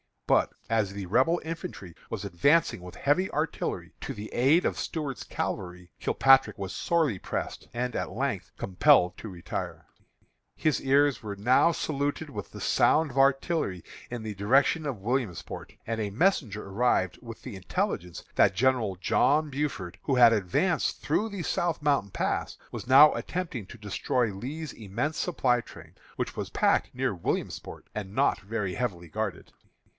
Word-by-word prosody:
But, - - +3 0.2
as 110 -4 +1
the 100 -1 -5
Rebel 130 - +3
infantry 160 - -6 0.2
was 105 -3 -4
advancing 100 - +2
with 90 0 -10
heavy 180 +7 +1
artillery 155 +2 -2
to - - -4
the 105 +1 -8
aid 140 +8 +4
of - - -1
Stuart's 150 -6 -4
cavalry, 90 -1 -4
Kilpatrick 135 -5 +4
was 95 -1 -5
sorely 155 - +1
pressed, - - -4
and, 125 +1 -2
at - - -2
length, - - -2
compelled 95 -2 +4
to 110 - -7
retire. 90 -2 -6 0.7
His 155 -2 +1
ears 140 +1 +3
were 105 -3 -5
now 125 +11 +4
saluted 145 +1 -2
with 105 -6 -6
the - - -10
sound 155 -2 +3
of 130 - -9
artillery 135 - +2 0.3
in 120 -2 -5
the 110 -1 -4
direction 135 - +2
of 125 -8 -4
Williamsport, 120 -4 -3
and 115 0 -2
a 105 - -1
messenger 115 - +1
arrived 115 +6 +1
with 115 -2 -10
the 120 -7 -7
intelligence 90 -2 -3
that 95 - +4
General 120 -3 +2
John 145 - +2
Buford, 135 - -3
who 135 - +1
had 120 -2 +8
advanced 110 - 0
through 205 +9 +1
the 200 -4 -5
South 175 -2 0
Mountain 140 -9 +1
Pass, - - -2
was - - -7
now 140 +4 +8
attempting 160 - -4
to 120 - -11
destroy 110 +2 -1
Lee's 145 +9 -6
immense 120 - -3
supply 130 -8 +1
train, - - -14 0.2
which - - -3
was - - -3
packed - - +1
near 130 -3 0
Williamsport, 85 - -4
and 100 -1 -6
not - - +2
very 100 -2 -3
heavily 90 -8 -3
guarded. 105 +2 -4
120 Hz, 160 wpm, -28 LUFS, 100-145 Hz, 0.7 s, had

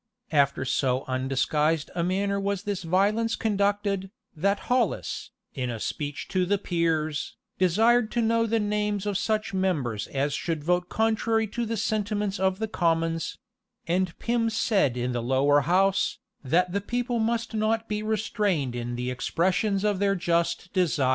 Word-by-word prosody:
After 140 -3 +2
so 130 0 +1
undisguised 135 +4 0
a 170 - -1
manner 200 +3 0
was 200 -1 -2
this 205 -3 -2
violence 205 +6 +1
conducted, 200 -2 0 0.3
that 200 +6 +1
Hollis, 245 -5 -1 0.2
in 125 -2 -3
a 115 -2 -4
speech 145 +4 -4
to 185 -1 +1
the 200 +3 +1
peers, 165 -5 -1 0.2
desired 220 +6 +4
to 240 - +1
know 230 0 +2
the 225 +1 +1
names 210 -1 -1
of 205 -1 -1
such 215 +1 -1
members 150 - -1
as 140 +1 -1
should 160 -3 -2
vote 180 +2 +1
contrary 225 0 +1
to 235 +2 -3
the 230 0 -2
sentiments 210 -1 -1
of 190 0 +1
the 220 +1 -2
commons:[] 165 -4 0 0.5
and 180 0 0
Pym 235 -1 0
said 200 - +1
in 125 +1 -1
the 120 -1 -2
lower 135 +4 +3
house, 190 +6 +2 0.3
that 175 +7 +2
the 200 +2 -1
people 240 +3 -1
must 230 +1 -1
not 220 +1 0
be 210 0 -2
restrained 210 - 0
in 120 0 -3
the 125 +1 -2
expressions 190 - 0
of 205 -3 +1
their 200 0 +2
just 170 0 0
desires. 165 -8 +2
190 Hz, 160 wpm, -26 LUFS, 155-215 Hz, 0.5 s, desired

